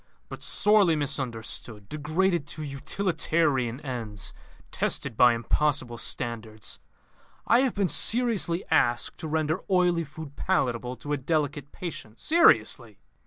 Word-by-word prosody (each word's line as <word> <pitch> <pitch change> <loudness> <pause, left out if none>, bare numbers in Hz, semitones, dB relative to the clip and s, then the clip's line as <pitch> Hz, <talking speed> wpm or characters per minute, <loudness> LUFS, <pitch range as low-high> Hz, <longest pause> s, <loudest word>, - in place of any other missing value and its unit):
"But - - -8
sorely 205 -6 +4
misunderstood; 120 -7 -3
degraded 155 - 0
to 155 +1 -5
utilitarian 145 -3 0
ends; 115 -7 -5 0.4
tested - - -1
by 120 +1 +5
impossible 120 0 -1
standards. 110 -3 -5 0.7
I 235 - +4
have 260 -2 +1
been 200 -2 +1
seriously 215 -6 +2
asked 120 0 +1
to 160 - -5
render 155 0 0
oily 180 -3 +2
food 150 -1 -10
palatable 125 -8 -1
to 145 +3 -5
a - - +1
delicate 145 0 -2
patient. 145 -11 -8
Seriously!" 120 - +3
145 Hz, 120 wpm, -26 LUFS, 120-170 Hz, 0.7 s, by